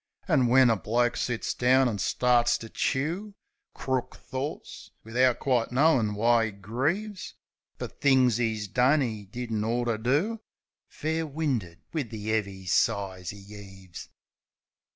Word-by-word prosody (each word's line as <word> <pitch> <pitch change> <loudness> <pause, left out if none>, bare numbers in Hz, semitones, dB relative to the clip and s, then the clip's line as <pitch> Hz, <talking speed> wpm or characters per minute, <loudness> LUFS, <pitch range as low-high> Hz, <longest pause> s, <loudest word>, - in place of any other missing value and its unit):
An' 140 -8 +3
when 125 0 +5
a - - +3
bloke 120 +4 0
sits 120 -2 -2
down 130 +1 +3
an' 105 -4 -2
starts 120 +3 +2
to 115 - -10
chew 170 - -2 0.4
Crook 130 -2 -2
thorts, 135 +3 -6 0.2
wivout 125 +2 +2
quite 125 -4 0
knowin' 125 -6 +3
why 115 +2 +3
'e - - -6
grieves 150 - -3 0.4
Fer - - -4
things 130 -4 +2
'e's 110 -3 -1
done 130 +7 +3
'e 110 -4 -4
didn't 115 0 -3
ort 120 +2 -1
to 110 -2 -1
do 155 - 0 0.2
— - - -67
Fair 160 +1 -3
winded 130 - -3
wiv 145 -8 -2
the 110 -1 -4
'eavy 100 -3 -2
sighs 95 0 0
'e 100 - -11
'eaves. 95 -3 -11
120 Hz, 145 wpm, -27 LUFS, 110-135 Hz, 0.4 s, when